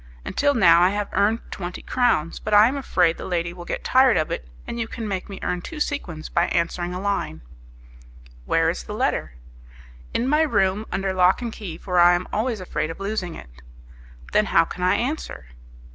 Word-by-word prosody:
Until 285 Hz, 0 st, +1 dB
now 170 Hz, -6 st, +6 dB
I 180 Hz, -, +5 dB
have 205 Hz, 0 st, -2 dB
earned 220 Hz, +3 st, +2 dB
twenty 180 Hz, -1 st, -6 dB
crowns, 230 Hz, -11 st, +1 dB
but 210 Hz, 0 st, 0 dB
I 210 Hz, +2 st, +8 dB
am 260 Hz, -, -1 dB
afraid 180 Hz, -11 st, +1 dB
the -, -, -6 dB
lady 170 Hz, -1 st, -2 dB
will 175 Hz, -1 st, -10 dB
get -, -, -4 dB
tired 260 Hz, -4 st, +4 dB
of 155 Hz, -, -1 dB
it, 60 Hz, -, -4 dB, 0.2 s
and 235 Hz, -, -5 dB
you 230 Hz, -, -2 dB
can 225 Hz, -1 st, -6 dB
make 190 Hz, -1 st, -4 dB
me 195 Hz, -, -7 dB
earn 180 Hz, 0 st, -1 dB
two 315 Hz, -, -8 dB
sequins 180 Hz, -, -3 dB
by 170 Hz, -, +1 dB
answering 175 Hz, +1 st, -1 dB
a -, -, -4 dB
line." 200 Hz, -, -2 dB, 1.0 s
"Where -, -, +2 dB
is -, -, -6 dB
the -, -, -6 dB
letter?" -, -, -1 dB, 0.8 s
"In 240 Hz, -, -1 dB
my 300 Hz, +3 st, +3 dB
room 210 Hz, -7 st, +1 dB
under 195 Hz, 0 st, -1 dB
lock 185 Hz, +5 st, +3 dB
and 230 Hz, -2 st, -4 dB
key, 180 Hz, -7 st, -7 dB
for 180 Hz, -2 st, -1 dB
I 175 Hz, 0 st, +7 dB
am 175 Hz, +1 st, -3 dB
always 225 Hz, +1 st, -1 dB
afraid 155 Hz, -4 st, -3 dB
of 165 Hz, -, -7 dB
losing 195 Hz, -4 st, -3 dB
it." 60 Hz, 0 st, -13 dB, 0.7 s
"Then 210 Hz, -, +3 dB
how 165 Hz, -, +4 dB
can 180 Hz, -, -8 dB
I 185 Hz, +2 st, +3 dB
answer?" 245 Hz, -, -4 dB
190 Hz, 205 wpm, -23 LUFS, 175-225 Hz, 1.0 s, I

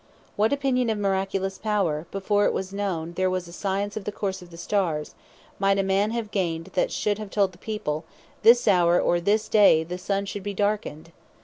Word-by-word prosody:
What 215 Hz, +2 st, +2 dB
opinion 265 Hz, -4 st, +1 dB
of 220 Hz, -, 0 dB
miraculous 195 Hz, -1 st, -1 dB
power, 185 Hz, -8 st, -1 dB
before 205 Hz, +1 st, +1 dB
it -, -, +2 dB
was 190 Hz, 0 st, -4 dB
known 175 Hz, -5 st, -3 dB
there 185 Hz, +1 st, +1 dB
was 185 Hz, -1 st, -2 dB
a 170 Hz, -, -11 dB
Science 200 Hz, +2 st, -2 dB
of 215 Hz, -, -4 dB
the 210 Hz, -, -3 dB
course 195 Hz, -2 st, -3 dB
of 180 Hz, -, -13 dB
the 170 Hz, -, -12 dB
Stars, 170 Hz, -5 st, -1 dB, 0.5 s
might 195 Hz, 0 st, +3 dB
a 195 Hz, -, +2 dB
man 195 Hz, +2 st, +1 dB
have 225 Hz, -2 st, -3 dB
gained, 170 Hz, -2 st, -2 dB
that 180 Hz, -, +1 dB
should 210 Hz, 0 st, -1 dB
have 210 Hz, -2 st, -6 dB
told 200 Hz, -2 st, +1 dB
the 175 Hz, -, -19 dB
people, 180 Hz, -9 st, -3 dB, 0.4 s
This 240 Hz, +2 st, +6 dB
hour, 175 Hz, -2 st, +4 dB
or 175 Hz, -, +2 dB
day 205 Hz, -3 st, +4 dB
the 180 Hz, +2 st, -6 dB
Sun 195 Hz, +2 st, -1 dB
should 200 Hz, 0 st, -5 dB
be 200 Hz, +1 st, -5 dB
darkned? 200 Hz, -6 st, -2 dB
195 Hz, 205 wpm, -25 LUFS, 180-205 Hz, 0.5 s, This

